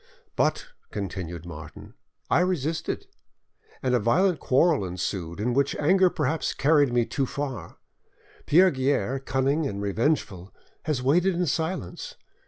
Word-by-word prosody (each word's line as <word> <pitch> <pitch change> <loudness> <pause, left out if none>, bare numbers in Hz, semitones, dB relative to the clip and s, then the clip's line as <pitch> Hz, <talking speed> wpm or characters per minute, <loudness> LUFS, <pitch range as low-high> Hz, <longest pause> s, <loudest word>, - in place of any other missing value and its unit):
"But," - - +1 0.2
continued 90 -4 -5
Martin, 80 -3 -10 0.3
"I - - +3
resisted, 165 - -1 0.8
and 130 -1 +1
a 125 - +4
violent 175 - +2
quarrel 145 - +3
ensued, 90 -1 -4
in 120 +4 0
which 140 +2 +1
anger 185 +5 +4
perhaps 155 -1 -1
carried 145 -3 +3
me 120 -1 +2
too 135 +2 -2
far; 130 - -5 0.7
Pierre 185 +4 +6
Guerre, 135 0 0
cunning 135 +3 0
and 100 -4 -5
revengeful, 100 - -1 0.3
has 145 -5 -1
waited 175 +7 +3
in 180 +1 0
silence. 160 - -3
135 Hz, 130 wpm, -26 LUFS, 100-160 Hz, 0.8 s, Pierre